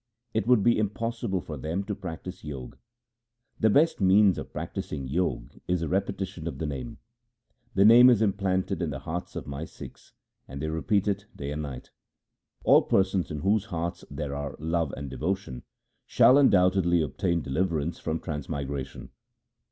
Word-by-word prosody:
It 110 Hz, 0 st, -1 dB
would 125 Hz, -5 st, +5 dB
be 120 Hz, 0 st, +4 dB
impossible 110 Hz, -1 st, -2 dB
for 75 Hz, -3 st, -7 dB
them 80 Hz, +8 st, -3 dB
to 105 Hz, -, -4 dB
practise 90 Hz, 0 st, -7 dB
Jog. 70 Hz, -5 st, -7 dB, 0.8 s
The 110 Hz, -, +4 dB
best 150 Hz, +3 st, +3 dB
means 95 Hz, +1 st, +5 dB
of -, -, -8 dB
practising 70 Hz, -4 st, -5 dB
Jog 75 Hz, -4 st, -2 dB
is 90 Hz, -1 st, 0 dB
the 85 Hz, -, -1 dB
repetition 95 Hz, -2 st, -2 dB
of -, -, -5 dB
the 80 Hz, -, -3 dB
Name. 75 Hz, -, -5 dB, 0.8 s
The 100 Hz, +1 st, +5 dB
Name 120 Hz, +3 st, +9 dB
is 120 Hz, -4 st, +5 dB
implanted 95 Hz, -4 st, 0 dB
in 85 Hz, -, -1 dB
the 70 Hz, -, -4 dB
hearts 80 Hz, +5 st, -6 dB
of -, -, -5 dB
my 70 Hz, +2 st, -5 dB
Sikhs, -, -, -12 dB, 0.3 s
and 70 Hz, -, -8 dB
they 80 Hz, +2 st, -2 dB
repeat 100 Hz, +6 st, 0 dB
it 100 Hz, 0 st, -1 dB
day 70 Hz, 0 st, -5 dB
and 75 Hz, +1 st, -3 dB
night. 70 Hz, -4 st, -7 dB, 0.7 s
All -, -, +6 dB
persons 95 Hz, -1 st, +1 dB
in 75 Hz, -1 st, -5 dB
whose 100 Hz, +2 st, +2 dB
hearts 85 Hz, -5 st, -4 dB
there 70 Hz, -2 st, -4 dB
are 70 Hz, -1 st, -4 dB
love 80 Hz, -1 st, -1 dB
and 70 Hz, 0 st, -5 dB
devotion, 75 Hz, -4 st, -3 dB, 0.5 s
shall 135 Hz, +3 st, +6 dB
undoubtedly 90 Hz, -, +4 dB
obtain 85 Hz, +4 st, -1 dB
deliverance 80 Hz, +2 st, -1 dB
from 80 Hz, +1 st, -2 dB
trans 75 Hz, -3 st, -5 dB
migration. 70 Hz, -3 st, -5 dB
85 Hz, 165 wpm, -27 LUFS, 75-100 Hz, 0.8 s, Name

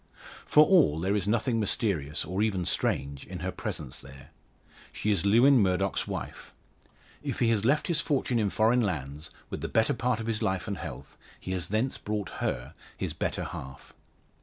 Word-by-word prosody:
For 150 Hz, +1 st, +7 dB
all 155 Hz, -, +4 dB
there 95 Hz, +4 st, +1 dB
is 100 Hz, -2 st, -1 dB
nothing 115 Hz, +2 st, +1 dB
mysterious, 90 Hz, -8 st, -1 dB
or 95 Hz, +5 st, -2 dB
even 100 Hz, -5 st, +1 dB
strange 70 Hz, -2 st, -1 dB
in -, -, -7 dB
her -, -, -2 dB
presence 60 Hz, -, -5 dB
there. 70 Hz, +1 st, -13 dB, 0.6 s
She 105 Hz, -, -1 dB
is 100 Hz, -1 st, +1 dB
Lewin 125 Hz, +6 st, +6 dB
Murdoch's 90 Hz, -4 st, +1 dB
wife. -, -, -6 dB, 0.7 s
If -, -, -3 dB
he 120 Hz, -, +2 dB
has 110 Hz, -2 st, +1 dB
left 145 Hz, +5 st, +3 dB
his 170 Hz, -3 st, +1 dB
fortune 130 Hz, -4 st, 0 dB
in 105 Hz, -2 st, +1 dB
foreign 115 Hz, +5 st, +3 dB
lands, 75 Hz, -, -3 dB, 0.2 s
with -, -, -4 dB
the -, -, -2 dB
better 110 Hz, 0 st, +2 dB
part 120 Hz, 0 st, 0 dB
of 110 Hz, -, -4 dB
his 115 Hz, -2 st, -2 dB
life 95 Hz, +1 st, -1 dB
and 100 Hz, -4 st, -3 dB
health, -, -, -8 dB, 0.2 s
he 95 Hz, -, -6 dB
has 90 Hz, -2 st, -2 dB
thence 110 Hz, +6 st, -1 dB
brought 105 Hz, -2 st, -3 dB
her, -, -, -2 dB, 0.2 s
his -, -, -3 dB
better -, -, -2 dB
half. 65 Hz, 0 st, -8 dB
105 Hz, 185 wpm, -28 LUFS, 85-115 Hz, 0.7 s, For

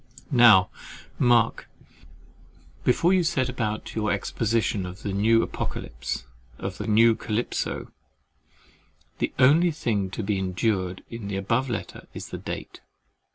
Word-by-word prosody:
Now 115 Hz, -7 st, +6 dB, 0.5 s
mark, 120 Hz, -2 st, +3 dB, 1.1 s
before 170 Hz, +8 st, +3 dB
you 185 Hz, -2 st, +3 dB
set 130 Hz, -5 st, 0 dB
about 110 Hz, -4 st, -3 dB
your 105 Hz, -1 st, -1 dB
exposition 110 Hz, 0 st, 0 dB
of 90 Hz, +1 st, -10 dB
the 100 Hz, -, -3 dB
new 115 Hz, +3 st, +3 dB
Apocalypse -, -, -4 dB, 0.3 s
of 95 Hz, +1 st, -6 dB
the 105 Hz, -, -4 dB
new 115 Hz, +2 st, +5 dB
Calypso, 110 Hz, +1 st, -3 dB, 1.3 s
the -, -, 0 dB
only 150 Hz, +7 st, +5 dB
thing 105 Hz, -, -1 dB
to 105 Hz, -, -5 dB
be 100 Hz, -1 st, 0 dB
endured 95 Hz, 0 st, -1 dB
in 115 Hz, -3 st, -6 dB
the 100 Hz, -, -3 dB
above 115 Hz, +7 st, 0 dB
letter 115 Hz, -, -5 dB
is -, -, -7 dB
the -, -, -6 dB
date. -, -, -7 dB
110 Hz, 130 wpm, -25 LUFS, 100-120 Hz, 1.3 s, Now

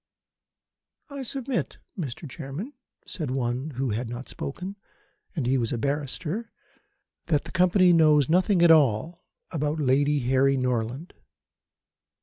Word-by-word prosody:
"I 280 Hz, -1 st, -5 dB
submit, 260 Hz, -1 st, -3 dB, 0.2 s
Mr. 155 Hz, -, -5 dB
Chairman," 155 Hz, -, -7 dB, 0.3 s
said 155 Hz, -7 st, -5 dB
one 130 Hz, +3 st, -2 dB
who 130 Hz, -1 st, -1 dB
had 115 Hz, +3 st, -3 dB
not 120 Hz, +2 st, -6 dB
spoken 180 Hz, +8 st, -6 dB, 0.6 s
and 150 Hz, -7 st, -1 dB
he 130 Hz, +2 st, +2 dB
was 115 Hz, -2 st, -1 dB
a 120 Hz, -, -1 dB
barrister 150 Hz, -, -3 dB, 0.8 s
"that 150 Hz, -4 st, +2 dB
the 160 Hz, -, -10 dB
Company 180 Hz, 0 st, +4 dB
knows 155 Hz, -4 st, +5 dB
nothing 180 Hz, +2 st, +3 dB
at 170 Hz, -, +7 dB
all 155 Hz, +2 st, +3 dB, 0.3 s
about 150 Hz, -1 st, -1 dB
Lady 145 Hz, +1 st, +2 dB
Harry 135 Hz, +2 st, +3 dB
Norland. 125 Hz, +4 st, -2 dB
145 Hz, 130 wpm, -26 LUFS, 130-175 Hz, 0.8 s, at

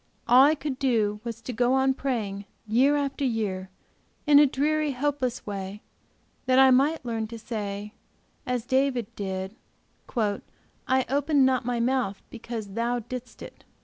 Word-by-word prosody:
All 250 Hz, +3 st, +7 dB
I 300 Hz, +3 st, +5 dB
could 285 Hz, -3 st, -5 dB
do 220 Hz, -6 st, +1 dB
was 230 Hz, -1 st, -6 dB
to 250 Hz, -, -6 dB
go 245 Hz, +2 st, +2 dB
on 265 Hz, 0 st, +3 dB
praying, 215 Hz, -8 st, -3 dB, 0.2 s
year 260 Hz, +7 st, +4 dB
after 280 Hz, -1 st, -2 dB
year, 205 Hz, -7 st, -2 dB, 0.6 s
in 290 Hz, -1 st, +7 dB
a 295 Hz, -, +7 dB
dreary, 300 Hz, +2 st, 0 dB
hopeless 265 Hz, -2 st, -2 dB
way, 200 Hz, 0 st, -6 dB, 0.6 s
that 255 Hz, 0 st, +4 dB
I 265 Hz, 0 st, +7 dB
might 275 Hz, +3 st, +2 dB
learn 225 Hz, -2 st, -2 dB
to 230 Hz, +1 st, -8 dB
say, 210 Hz, -2 st, -5 dB, 0.5 s
as 250 Hz, -2 st, -2 dB
David 260 Hz, -3 st, 0 dB
did, 190 Hz, 0 st, -4 dB, 0.6 s
'I 235 Hz, +4 st, -2 dB
opened 285 Hz, +1 st, +2 dB
not 260 Hz, -2 st, +1 dB
my 245 Hz, -1 st, -1 dB
mouth 240 Hz, -5 st, 0 dB
because 225 Hz, -3 st, -6 dB
Thou 235 Hz, +4 st, -1 dB
didst 245 Hz, +1 st, -8 dB
it.' -, -, -12 dB
245 Hz, 150 wpm, -26 LUFS, 215-265 Hz, 0.6 s, All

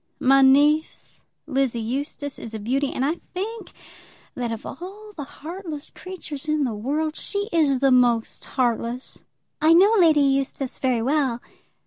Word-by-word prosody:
My 270 Hz, +1 st, +5 dB
niece, 290 Hz, +4 st, +3 dB, 0.2 s
Lizzie 265 Hz, -5 st, 0 dB
Eustace, 275 Hz, +4 st, -4 dB
is 225 Hz, -1 st, -6 dB
a -, -, -4 dB
beauty; 265 Hz, +6 st, -1 dB
and 260 Hz, -, -1 dB
I 315 Hz, +4 st, 0 dB, 0.2 s
think 435 Hz, +5 st, -5 dB, 0.6 s
that, 240 Hz, -2 st, -3 dB
of 225 Hz, -, -6 dB
all 405 Hz, +7 st, -9 dB
the 295 Hz, -, -5 dB
heartless 315 Hz, +1 st, -8 dB
creatures 315 Hz, -6 st, -8 dB
in 305 Hz, -1 st, +2 dB
the 245 Hz, -4 st, -1 dB
world, 295 Hz, +9 st, -2 dB
she 405 Hz, 0 st, -3 dB
is 300 Hz, -5 st, +3 dB
the 270 Hz, +1 st, +3 dB
most 240 Hz, -3 st, +2 dB
heartless." 245 Hz, 0 st, -2 dB, 0.4 s
"I 315 Hz, +1 st, +6 dB
know 390 Hz, +6 st, +6 dB
Lady 315 Hz, -4 st, +5 dB
Eustace 275 Hz, -1 st, 0 dB
very 250 Hz, -4 st, +1 dB
well." 265 Hz, -3 st, +1 dB
275 Hz, 150 wpm, -23 LUFS, 255-315 Hz, 0.6 s, I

